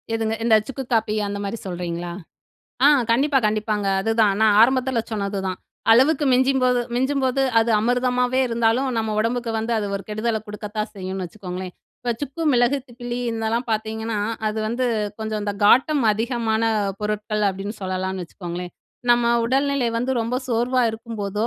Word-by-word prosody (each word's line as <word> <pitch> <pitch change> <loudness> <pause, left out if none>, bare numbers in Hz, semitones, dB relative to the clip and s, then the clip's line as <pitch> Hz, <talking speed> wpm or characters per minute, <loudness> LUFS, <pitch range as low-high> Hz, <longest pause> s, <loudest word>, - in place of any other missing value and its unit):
எதுங்க? 225 -1 0
இந்த 230 -1 +5
சுக்கு 270 0 -5
காபி 215 -2 +1
அந்த 200 0 -4
மாரி 200 +3 -3
சொல்றீங்களா? 175 -1 -4 0.7
ஆ, - - +8 0.2
கண்டிப்பா, 270 +4 +3
கண்டிப்பாங்க. 210 -1 -1
அதுதான் 220 -1 +2
நான் 215 -2 +5
ஆரம்பத்துல 255 +1 +3
சொன்னது 200 -1 -2
தான். 185 - -4 0.3
அளவுக்கு 275 +6 +4
மிஞ்சும்போது 255 -1 +3
மிஞ்சும்போது 265 +1 +1 0.2
அது 225 +1 +2
அமிர்தமாவே 250 +2 +1
இருந்தாலும் 230 +3 +1
நம்ம 220 -1 -1
உடம்புக்கு 235 +1 -1
வந்து 225 +2 -2
அது 210 - -2
ஒரு 195 - -7
கெடுதல 220 +1 -1
குடுக்கத்தான் 210 +1 -5
செய்யும்ன்னு 190 -1 -4
வச்சுக்கோங்களேன். 185 -1 -7 0.3
இப்ப 240 -1 -1
சுக்கு, 285 +3 -4
மிளகு, 245 +2 +3
திப்பிலி 240 -1 -6
இதெல்லாம் 225 +2 -1
பாத்தீங்கன்னா, 220 0 -2 0.3
அது 215 +1 -1
வந்து 245 +3 -1 0.3
கொஞ்சம் 220 -1 -3
இந்த 205 0 -2
காட்டம் 270 +6 +5
அதிகமான 225 0 -1 0.4
பொருட்கள் 210 0 -2
அப்டின்னு 195 +2 -4
சொல்லலாம்னு 185 0 -2
வச்சுக்கோங்களேன். 175 0 -7 0.4
நம்ம 240 0 +4
உடல் 265 +4 +2
நிலை 265 -4 +1
வந்து 250 +3 -1
ரொம்ப 230 +2 -2
சோர்வா 245 +2 +1
இருக்கும் 225 0 -8
போதோ, 205 +2 -1
225 Hz, 150 wpm, -22 LUFS, 210-245 Hz, 0.7 s, ஆ